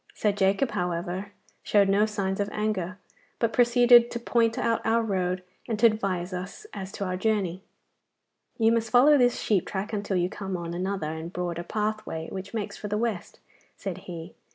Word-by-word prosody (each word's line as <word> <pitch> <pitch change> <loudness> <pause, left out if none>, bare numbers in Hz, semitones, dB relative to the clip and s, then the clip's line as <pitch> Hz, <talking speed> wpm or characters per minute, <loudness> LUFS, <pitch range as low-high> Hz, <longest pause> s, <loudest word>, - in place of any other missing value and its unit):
Sir 210 - +2
Jacob, 200 +6 +1
however, 180 +3 -3 0.3
showed 200 -2 +3
no 200 +2 +3
signs 195 -2 -2
of 205 0 0
anger, 200 -4 -2 0.4
but 230 -1 0
proceeded 240 0 +6
to 235 - -4
point 230 -1 +1
out 230 -1 0
our 230 +1 +2
road 185 -3 -1 0.2
and 225 - -1
to 225 - +4
advise 195 -5 +1
us 190 - -6
as 190 -1 -6
to 200 - -3
our 185 -1 -2
journey. 190 -3 0 1.0
'You 225 -1 +4
must 230 -1 +1
follow 255 +6 +6
this 245 -3 +3
sheep 200 -5 +1
track 200 +3 -4
until 200 -2 -1
you 175 0 +2
come 195 -1 -5
on 170 -1 -5
another 185 -3 -2
and 160 +2 -6
broader 175 -2 -3
pathway 210 -4 -3
which 190 0 -6
makes 215 -3 -4
for 210 - -6
the 210 +1 -1
West,' 220 -5 -3 0.4
said - - -5
he. 170 0 -7
200 Hz, 180 wpm, -27 LUFS, 185-225 Hz, 1.0 s, proceeded